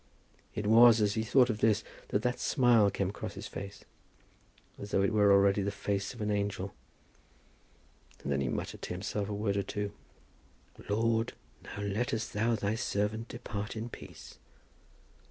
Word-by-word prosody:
It 105 Hz, -, -3 dB
was 115 Hz, +1 st, +7 dB
as 105 Hz, -1 st, +2 dB
he 110 Hz, -, 0 dB
thought 125 Hz, +2 st, +4 dB
of 105 Hz, -, -5 dB
this 110 Hz, -1 st, +3 dB, 0.2 s
that 105 Hz, -, 0 dB
that 125 Hz, 0 st, 0 dB
smile 120 Hz, -7 st, +4 dB
came 100 Hz, -1 st, -1 dB
across -, -, -6 dB
his -, -, -7 dB
face, 100 Hz, 0 st, -8 dB, 0.9 s
as 100 Hz, -, -7 dB
though 95 Hz, -, +2 dB
it 100 Hz, -, +1 dB
were 105 Hz, -1 st, +5 dB
already 100 Hz, 0 st, +5 dB
the 100 Hz, -, 0 dB
face 100 Hz, 0 st, -2 dB
of 120 Hz, -, -9 dB
an 105 Hz, 0 st, 0 dB
angel. 100 Hz, -1 st, -2 dB, 1.5 s
And 70 Hz, -, -3 dB
then 70 Hz, -, 0 dB
he 65 Hz, -, 0 dB
muttered -, -, -4 dB
to -, -, -4 dB
himself 100 Hz, +2 st, -3 dB
a -, -, -2 dB
word 100 Hz, -1 st, 0 dB
or -, -, +2 dB
two. 100 Hz, +1 st, -3 dB, 1.0 s
"Lord, 115 Hz, +2 st, +1 dB, 0.3 s
now 100 Hz, -, -7 dB
lettest 110 Hz, +2 st, -2 dB
Thou 115 Hz, +3 st, +2 dB
Thy 105 Hz, -1 st, -1 dB
servant 110 Hz, 0 st, -1 dB
depart 110 Hz, -3 st, -5 dB
in 115 Hz, +2 st, -4 dB
peace. -, -, -11 dB
105 Hz, 170 wpm, -31 LUFS, 100-115 Hz, 1.5 s, was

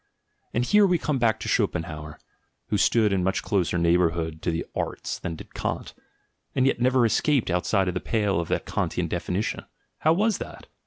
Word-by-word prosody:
And 120 Hz, +2 st, 0 dB
here 210 Hz, +7 st, +5 dB
we 180 Hz, -1 st, +3 dB
come 150 Hz, -4 st, -1 dB
back 110 Hz, -2 st, +2 dB
to -, -, -4 dB
Schopenhauer, 75 Hz, -3 st, -1 dB, 0.5 s
who 105 Hz, -, +1 dB
stood 110 Hz, -2 st, +3 dB
in 95 Hz, -2 st, +1 dB
much 95 Hz, +1 st, 0 dB
closer 90 Hz, -3 st, 0 dB
neighbourhood 85 Hz, -2 st, +1 dB
to -, -, -1 dB
the 85 Hz, 0 st, -2 dB
arts -, -, -3 dB
than 85 Hz, -, -4 dB
did -, -, -12 dB
Kant, -, -, -3 dB, 0.6 s
and 130 Hz, -, +3 dB
yet 135 Hz, -3 st, +1 dB
never 125 Hz, -1 st, +4 dB
escaped 130 Hz, -, +2 dB
outside 95 Hz, +2 st, +1 dB
the 90 Hz, 0 st, -1 dB
pale 105 Hz, -5 st, 0 dB
of 85 Hz, -, -3 dB
the -, -, +1 dB
Kantian -, -, -2 dB
definition; 95 Hz, +5 st, -2 dB, 0.4 s
how 160 Hz, -, +4 dB
was 210 Hz, +4 st, +1 dB
that? -, -, -8 dB
100 Hz, 180 wpm, -25 LUFS, 85-125 Hz, 0.6 s, here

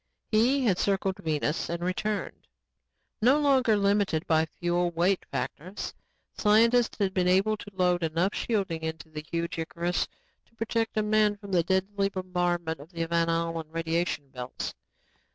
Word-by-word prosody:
He 250 Hz, +5 st, +3 dB
had 190 Hz, -5 st, +2 dB
circled 195 Hz, -1 st, 0 dB
Venus 150 Hz, -1 st, -1 dB
and 170 Hz, 0 st, -3 dB
returned. 200 Hz, +3 st, -3 dB, 0.7 s
No 260 Hz, +6 st, +5 dB
longer 260 Hz, -7 st, +4 dB
limited 200 Hz, -5 st, +1 dB
by 160 Hz, 0 st, +2 dB
fuel 175 Hz, 0 st, +1 dB
weight 175 Hz, +3 st, +1 dB
factors, 185 Hz, +6 st, -4 dB, 0.4 s
scientists 230 Hz, +3 st, +4 dB
had 195 Hz, -2 st, 0 dB
been 180 Hz, -2 st, +1 dB
able 195 Hz, +4 st, +3 dB
to 205 Hz, -, -10 dB
load 180 Hz, -2 st, +1 dB
enough 165 Hz, +4 st, 0 dB
shielding 195 Hz, -8 st, -1 dB
into 160 Hz, 0 st, -5 dB
the 150 Hz, -1 st, -6 dB
huge 170 Hz, 0 st, -2 dB
Icarus 170 Hz, +2 st, -1 dB, 0.4 s
to 230 Hz, -, -31 dB
protect 225 Hz, 0 st, -1 dB
a 215 Hz, -, +3 dB
man 210 Hz, -1 st, +3 dB
from 200 Hz, -1 st, -10 dB
the 180 Hz, -2 st, +4 dB
deadly 195 Hz, +3 st, 0 dB
bombardment 175 Hz, -4 st, -1 dB
of 150 Hz, +5 st, -13 dB
the 165 Hz, -2 st, -2 dB
Van 170 Hz, 0 st, +1 dB
Allen 165 Hz, -1 st, -1 dB
radiation 165 Hz, -3 st, -1 dB
belts. 125 Hz, -2 st, -5 dB
180 Hz, 155 wpm, -28 LUFS, 165-210 Hz, 0.7 s, No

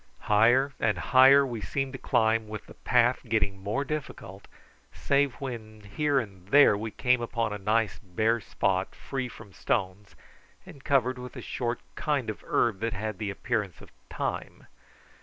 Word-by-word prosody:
Higher 120 Hz, +6 st, +3 dB
and 105 Hz, -4 st, +1 dB
higher 130 Hz, +9 st, +6 dB
we 120 Hz, -4 st, -5 dB
seemed 135 Hz, +4 st, -3 dB
to 130 Hz, -, -6 dB
climb, 110 Hz, -1 st, +1 dB
with 105 Hz, 0 st, -7 dB
the -, -, -13 dB
path 125 Hz, 0 st, +2 dB
getting 100 Hz, -3 st, 0 dB
more 105 Hz, +8 st, -2 dB
difficult, 130 Hz, -9 st, -6 dB, 0.4 s
save 140 Hz, -2 st, +1 dB
when 110 Hz, -5 st, -7 dB
here 140 Hz, +8 st, 0 dB
and 95 Hz, -6 st, -8 dB
there 140 Hz, -1 st, +6 dB
we 110 Hz, +2 st, -4 dB
came 125 Hz, +2 st, +1 dB
upon 115 Hz, -2 st, -2 dB
a 105 Hz, -, -5 dB
nice 110 Hz, +1 st, 0 dB
bare 110 Hz, +5 st, 0 dB
spot 95 Hz, -2 st, -1 dB
free 135 Hz, -2 st, -4 dB
from 100 Hz, -4 st, -13 dB
stones, 100 Hz, 0 st, -2 dB, 0.5 s
and 140 Hz, -, -13 dB
covered 130 Hz, -2 st, +1 dB
with 125 Hz, -1 st, -9 dB
a -, -, -7 dB
short -, -, -3 dB
kind -, -, -1 dB
of -, -, -12 dB
herb 110 Hz, -5 st, +1 dB
that 115 Hz, 0 st, -2 dB
had 110 Hz, -1 st, -4 dB
the 105 Hz, -, -2 dB
appearance 100 Hz, -3 st, -3 dB
of -, -, -15 dB, 0.2 s
thyme. -, -, -4 dB
115 Hz, 165 wpm, -28 LUFS, 105-130 Hz, 0.5 s, higher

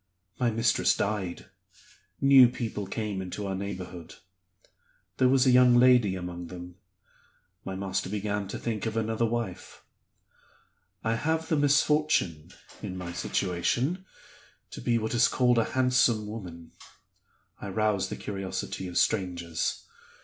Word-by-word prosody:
My 125 Hz, -2 st, +2 dB
mistress 115 Hz, 0 st, +2 dB
died. 100 Hz, -4 st, -2 dB, 0.7 s
New 135 Hz, -3 st, +7 dB
people 110 Hz, -5 st, -4 dB
came 105 Hz, -2 st, -3 dB
into 95 Hz, +2 st, -5 dB
our 95 Hz, -, -2 dB
neighborhood. 95 Hz, -3 st, -6 dB, 1.0 s
There 130 Hz, -, +4 dB
was 135 Hz, 0 st, +4 dB
a 130 Hz, -, +5 dB
young 125 Hz, -1 st, +6 dB
lady 120 Hz, -5 st, +5 dB
among 90 Hz, -1 st, -6 dB
them 90 Hz, +1 st, -10 dB, 0.9 s
my 95 Hz, -, -5 dB
master 95 Hz, 0 st, -2 dB
began 105 Hz, 0 st, -2 dB
to -, -, -5 dB
think 115 Hz, -2 st, -3 dB
of 110 Hz, 0 st, -3 dB
another 115 Hz, +1 st, 0 dB
wife. 115 Hz, -5 st, -5 dB, 1.2 s
I 115 Hz, -, +1 dB
have 160 Hz, +4 st, -1 dB
the 160 Hz, -, +2 dB
misfortune 145 Hz, -, +2 dB, 0.3 s
(in 95 Hz, -, -5 dB
my 85 Hz, -1 st, -6 dB
situation) 100 Hz, -, -1 dB, 0.7 s
to -, -, -8 dB
be 120 Hz, -1 st, +1 dB
what 110 Hz, 0 st, -2 dB
is 120 Hz, -, +4 dB
called 125 Hz, -2 st, +3 dB
a 115 Hz, -, +2 dB
handsome 125 Hz, -4 st, +3 dB
woman; 90 Hz, -6 st, -8 dB, 0.9 s
I 100 Hz, -, -5 dB
rouse 105 Hz, -1 st, 0 dB
the -, -, -4 dB
curiosity 95 Hz, -1 st, -5 dB
of 90 Hz, -, -4 dB
strangers. 85 Hz, -5 st, -1 dB
105 Hz, 135 wpm, -28 LUFS, 95-120 Hz, 1.2 s, New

